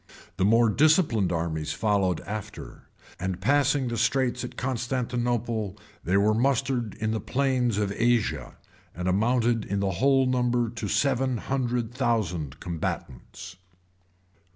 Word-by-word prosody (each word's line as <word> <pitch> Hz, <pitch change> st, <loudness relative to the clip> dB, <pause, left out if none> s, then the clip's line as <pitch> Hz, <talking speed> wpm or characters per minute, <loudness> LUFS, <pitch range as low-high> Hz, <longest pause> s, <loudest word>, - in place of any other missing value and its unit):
The 95 Hz, -, +2 dB
more 115 Hz, +3 st, +5 dB
disciplined 145 Hz, -, +3 dB
armies 80 Hz, -2 st, -2 dB
followed 100 Hz, -5 st, +1 dB
after; 110 Hz, +1 st, -8 dB, 0.3 s
and 90 Hz, 0 st, -3 dB
passing 140 Hz, +4 st, +2 dB
the 120 Hz, -1 st, -3 dB
straits 125 Hz, +1 st, +1 dB
at 125 Hz, -, -7 dB
Constantinople, 120 Hz, -4 st, -2 dB, 0.3 s
they 90 Hz, +3 st, +2 dB
were 105 Hz, +2 st, +3 dB
mustered 125 Hz, -1 st, 0 dB
in 110 Hz, -1 st, -2 dB
the 110 Hz, -, -1 dB
plains 130 Hz, -4 st, 0 dB
of 105 Hz, -1 st, 0 dB
Asia, 115 Hz, -, 0 dB, 0.4 s
and 90 Hz, +2 st, -3 dB
amounted 115 Hz, +4 st, +2 dB
in 100 Hz, -, -2 dB
the 100 Hz, -1 st, 0 dB
whole 135 Hz, +7 st, +3 dB
to 130 Hz, -, +1 dB
the -, -, +1 dB
number 125 Hz, -1 st, +1 dB
of 115 Hz, -3 st, -5 dB
seven 130 Hz, -2 st, +1 dB
hundred 120 Hz, -2 st, -2 dB
thousand 90 Hz, -, -1 dB
combatants. 85 Hz, -1 st, -6 dB
115 Hz, 135 wpm, -26 LUFS, 100-125 Hz, 0.4 s, more